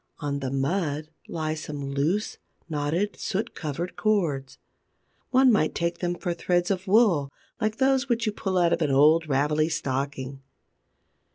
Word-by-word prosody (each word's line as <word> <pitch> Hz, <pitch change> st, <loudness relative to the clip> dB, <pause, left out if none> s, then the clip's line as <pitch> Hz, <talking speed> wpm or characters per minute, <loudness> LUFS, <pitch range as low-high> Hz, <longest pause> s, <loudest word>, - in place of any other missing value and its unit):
On 145 Hz, -2 st, -3 dB
the 135 Hz, -2 st, -3 dB
mud 150 Hz, +2 st, -1 dB, 0.2 s
lie 155 Hz, -1 st, -2 dB
some 145 Hz, -3 st, -5 dB
loose, 160 Hz, +10 st, -1 dB, 0.3 s
knotted, 160 Hz, +6 st, -1 dB
soot 200 Hz, +3 st, -2 dB
covered 165 Hz, +3 st, -4 dB
cords. 165 Hz, -11 st, 0 dB, 0.7 s
One 260 Hz, 0 st, +5 dB
might 185 Hz, -8 st, +2 dB
take 170 Hz, 0 st, -1 dB
them 175 Hz, -1 st, -1 dB
for 175 Hz, 0 st, -2 dB
threads 175 Hz, +2 st, 0 dB
of 190 Hz, +1 st, -2 dB
wool 190 Hz, -, +4 dB, 0.3 s
like 215 Hz, 0 st, 0 dB
those 265 Hz, 0 st, +2 dB
which 235 Hz, -1 st, +1 dB
you 215 Hz, -, +1 dB
pull 190 Hz, -2 st, -2 dB
out 170 Hz, -1 st, +4 dB
of 170 Hz, -, 0 dB
an 155 Hz, -, +2 dB
old 155 Hz, +4 st, +4 dB
ravelly 150 Hz, +3 st, +2 dB
stocking. 135 Hz, -2 st, -3 dB
165 Hz, 155 wpm, -26 LUFS, 145-195 Hz, 0.7 s, One